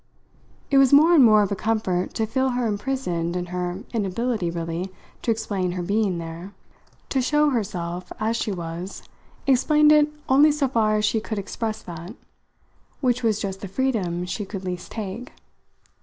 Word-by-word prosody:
It 275 - +6
was 270 -2 +5
more 310 +5 +7
and 300 -6 +7
more 215 -3 +6
of 200 - -2
a - - +1
comfort 190 -4 -1
to 220 - +1
feel 260 +4 0
her 245 -1 -1
imprisoned 205 -6 -2
in 180 0 -2
her 180 +2 -3
inability 215 -1 -1
really 170 +2 -4 0.3
to - - -3
explain 205 -5 -1
her 180 -1 -3
being 200 -1 +1
there. 170 +4 -7 0.5
To 265 - +1
show 295 +3 +3
herself 180 -7 -3
as 220 +2 0
she 225 - -1
was 175 +1 -6 0.4
explained 300 +3 +4
it 300 0 +5 0.2
only 285 +3 +6
so 290 -2 +1
far 220 -4 +2
as 210 0 +1
she 220 +1 +1
could 215 0 -4
express 215 +2 -4
that; 175 +5 -8 0.8
which 250 -3 +1
was 220 -3 +2
just 195 -2 -4
the 200 - -5
freedom 190 -7 -1
she 205 +4 -3
could 195 -1 -7
least 180 -1 -5
take. 220 +3 -6
215 Hz, 170 wpm, -24 LUFS, 180-250 Hz, 0.8 s, more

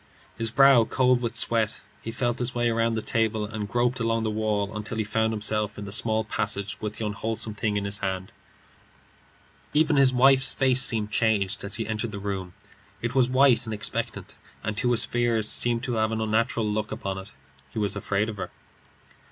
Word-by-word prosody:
His 115 -1 -1
brow 135 0 +6
cold 125 +1 +2
with 120 -1 -3
sweat, 110 -2 0 0.2
he - - -6
felt 120 0 -2
his 125 0 -3
way 120 -1 +1
round 115 0 0
the 110 - -3
table, 110 -2 0
and 105 -1 -5
groped 120 +2 0
along 115 -1 0
the 110 - -1
wall 105 -1 -1
until 110 +1 -4
he 110 - 0
found 110 +1 0
himself 105 -1 -1
in 105 - -6
the 100 - -7
small 110 +1 +2
passage 100 -2 -2
with 105 0 -4
the 110 - -4
unwholesome 110 +1 -2
thing 105 0 -1
in 100 - -2
his 100 0 -2
hand. 95 -1 -4 1.4
Even 155 -1 +3
his 135 -2 +5
wife's 135 +1 +5
face 130 -1 +3
seemed 110 -5 +3
changed 105 -3 +1
as 100 - -2
he 115 - -3
entered 110 +1 -3
the 100 - -6
room. 95 -3 -5 0.4
It - - -3
was 130 -2 +3
white 130 -1 +4
and 110 - -3
expectant, 105 - -4 0.3
and 110 - -3
to 120 +2 +1
his 120 -2 +5
fears 120 -3 0
seemed 120 +1 +1
to 125 -2 -2
have 110 0 +1
an 110 - -2
unnatural 110 +1 0
look 105 0 -2
upon 100 -3 -4
it. 95 +2 -11 0.4
He - - -11
was 105 -2 0
afraid 100 +1 -1
of 110 -2 -6
her. - - -5
110 Hz, 200 wpm, -25 LUFS, 105-120 Hz, 1.4 s, brow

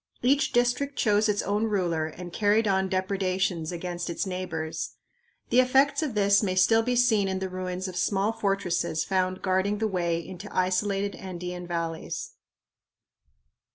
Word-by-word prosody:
Each 275 +4 +3
district 245 +4 +1
chose 210 -1 +3
its 205 -1 +1
own 205 +2 0
ruler 175 -7 0
and 175 +2 -9
carried 215 +1 +2
on 190 -1 +1
depredations 185 -3 -1
against 175 0 -4
its 170 - -2
neighbors. 175 -4 -4 0.6
The 250 - +5
effects 265 +4 +4
of 285 -8 -2
this 200 -1 +4
may 190 -3 -1
still 225 +5 +5
be 245 +2 0
seen 225 -5 +3
in 190 0 -1
the 190 0 -3
ruins 185 0 -4
of 185 - -7
small 200 +3 +1
fortresses 175 -6 -1
found 185 -1 -1
guarding 190 +2 +1
the 220 +1 0
way 175 -4 0
into 180 +4 -8
isolated 195 +2 0
Andean 180 -1 -6
valleys. 165 -2 -4
190 Hz, 155 wpm, -27 LUFS, 180-210 Hz, 0.6 s, The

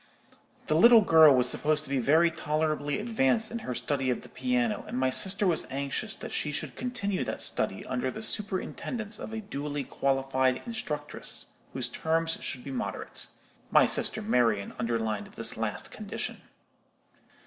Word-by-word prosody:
The - - 0
little 230 +8 +8
girl 160 -6 +7
was 125 -1 +3
supposed 150 +4 +1
to 155 - -10
be 135 - +1
very 160 +7 +4
tolerably 155 -2 -1
advanced 220 - +2
in 235 - -3
her 125 - -5
study 130 +2 -1
of 125 - -1
the - - -13
piano, 250 -4 -1
and - - -4
my 130 0 +1
sister 200 - +2
was 175 -4 +1
anxious 140 +10 -3
that - - -8
she 150 - -1
should 145 - -4
continue 205 -6 -2
that - - -4
study - - 0
under 125 +1 -2
the 220 - -6
superintendence 210 +2 -1
of - - -7
a 220 0 -4
duly 145 -7 -4
qualified 135 -1 0
instructress, 150 -11 -4 0.3
whose 125 -2 0
terms 165 +5 -1
should 125 -3 -4
be 140 - -7
moderate. 130 - -4 0.4
My - - +6
sister 220 - +2
Marian 115 - +1
underlined 110 -3 -1
this - - +2
last - - -3
condition. - - -5
150 Hz, 160 wpm, -28 LUFS, 130-205 Hz, 0.4 s, little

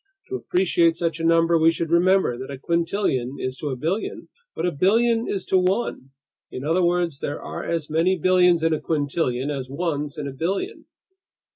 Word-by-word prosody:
To 385 - -3
appreciate 175 - +2
such 165 -1 -2
a - - -4
number, 165 0 +4
we 160 +1 +5
should 165 0 -2
remember 180 -5 +3
that 130 +3 -8
a 140 - -6
quintillion 165 -5 -1
is 130 0 -3
to 150 - -5
a 135 - -2
billion 165 - -3 0.3
what - - -2
a 180 - +1
billion 225 +8 +2
is 195 -2 -3
to 190 - +3
one, 185 - -1 0.4
in 130 - -7
other 165 +5 +1
words, 175 -4 0
there 145 - -4
are - - -6
as 165 -3 -2
many 165 +4 +1
billions 180 -1 +4
in 165 0 +3
a 155 - -2
quintillion 145 -3 -1
as 130 -2 -6
ones 145 -1 -3
in 145 -2 -4
a 135 - -6
billion! 190 - -3
165 Hz, 190 wpm, -23 LUFS, 145-180 Hz, 0.4 s, we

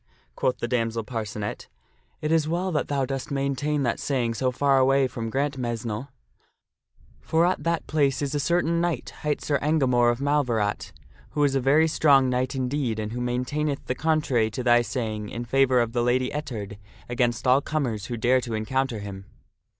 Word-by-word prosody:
" - - -38
quoth 125 - 0
the 120 - -3
damsel 115 -2 -1
Parcenet, 105 -2 -5 0.3
" - - -40
it 155 - 0
is 160 -2 +3
well 180 +3 -1
that 150 - -1
thou 140 -2 0
dost 135 0 -4
maintain 140 +1 -1
that 120 -3 0
saying 125 -5 0
so 130 +3 0
far 135 +1 +2
away 135 0 +4
from 115 -2 -5
Grantmesnle; 120 -3 -2 1.1
for 165 +1 +2
at 185 - 0
that 170 -1 0
place 140 -4 +1
is 140 -1 -2
a 145 - 0
certain 170 +2 +1
knight, 175 -1 -2
hight 150 -1 -1
Sir 145 -2 +1
Engamore 130 -6 +3
of 120 - -2
Malverat, 125 -8 0 0.5
who 145 - +3
is 140 -2 +3
a 135 - +2
very 145 +5 +4
strong 140 -5 +4
knight 125 +2 -1
indeed, 130 -3 -1
and 105 0 -3
who 125 +1 -4
maintaineth 125 +4 -2
the - - -1
contrary 135 -6 +1
to 115 +4 -5
thy 120 -1 +5
saying 110 -4 -3
in 120 +1 -5
favor 130 0 +3
of 120 -1 0
the 120 - +1
Lady 125 +2 +1
Ettard 110 -9 -5 0.3
against 120 0 0
all 130 +2 +5
comers 125 -10 -2
who 120 - -4
dare 125 +3 +3
to 120 -2 -4
encounter 130 +3 -1
him." 100 -1 -8
130 Hz, 190 wpm, -25 LUFS, 120-145 Hz, 1.1 s, thy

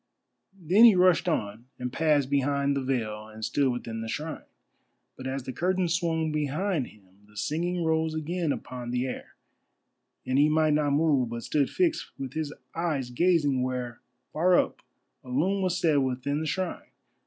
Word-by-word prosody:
Then 185 +6 +4
he 225 -4 +8
rushed 180 0 +4
on 110 -6 -2
and 125 0 -5
passed 150 -4 +2
behind 140 0 +1
the 140 - 0
veil 110 -5 -2
and 110 0 -6
stood 140 -3 +1
within 115 -2 -5
the 115 - -5
shrine. 155 +7 -5 0.7
But 130 - -7
as 135 0 -3
the 130 0 -6
curtains 180 +1 0
swung 165 -2 0
behind 150 +1 -1
him 105 - -18 0.2
the 105 0 -18
singing 170 - -1
rose 160 0 +1
again 160 +1 -1
upon 125 -3 -5
the 125 +1 -1
air, 130 - -7 0.9
and 130 +1 +1
he 150 +1 +5
might 155 0 +3
not 150 -1 +2
move, 145 -5 +2
but 115 0 -5
stood 145 -3 +1
fixed 345 -3 0
with 135 -1 -6
his 155 -2 -3 0.2
eyes 155 -7 -1
gazing 145 -2 +2
where, 125 -2 -3 0.3
far 175 +3 +4
up, - - 0 0.4
a 125 - -12
loom 180 +10 +1
was 185 -1 0
set 160 -4 +3
within 130 +3 -1
the 160 - -3
shrine. 185 +4 -3
145 Hz, 175 wpm, -27 LUFS, 130-165 Hz, 0.9 s, he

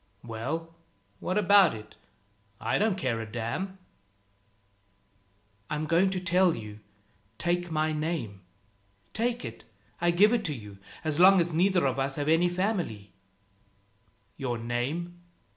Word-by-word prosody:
"Well, 140 +9 -4 0.5
what 185 - -2
about 200 - +6
it? 105 0 -11 0.7
I - - 0
don't 210 -2 +2
care 120 -10 -1
a 110 -1 -8
damn." 120 - -3 1.9
"I'm 150 +1 -2
going 170 +4 +3
to 190 -1 -2
tell 180 -1 +3
you. 105 -1 -8 0.6
Take 175 0 0
my 155 0 0
name. 150 - -3 0.7
Take 240 - -1
it 115 -1 -8 0.4
I 175 - +3
give 200 +6 +5
it 225 -8 0
you; 105 -8 -7 0.2
as 155 -1 -1
long 190 +1 +8
as 170 -1 0
neither 180 0 +3
of 135 0 0
us 135 0 -1
has 145 0 -2
any 165 +3 +4
family." 175 - -2 1.3
"Your 125 -4 -2
name?" 135 +10 -3
165 Hz, 130 wpm, -28 LUFS, 120-185 Hz, 1.9 s, long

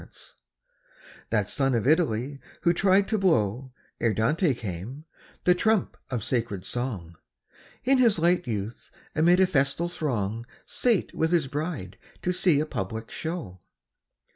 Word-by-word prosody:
_ - - -15 1.0
That - - +1
son 135 -3 +1
of 115 - 0
Italy 140 -3 +1 0.2
who 170 - +3
tried 195 +2 +3
to 220 - +1
blow, 130 - +1 0.3
Ere 115 -2 +1
Dante 150 - +2
came, 115 - -6 0.4
the 180 - +5
trump 215 +2 +1
of 120 -5 -2
sacred 115 -7 -2
song, 100 -10 -4 0.7
In 265 +1 +3
his 230 -6 +4
light 175 +1 +2
youth 110 0 -4 0.2
amid 175 +3 +4
a 190 - +6
festal 160 +1 +1
throng 115 - -2 0.2
Sate 235 -7 +1
with 160 +1 0
his 170 -5 +3
bride 140 - -4 0.2
to 180 - +1
see 175 -5 +3
a 155 - +1
public 110 -4 -5
show. 160 - -5
140 Hz, 140 wpm, -26 LUFS, 115-175 Hz, 1.0 s, a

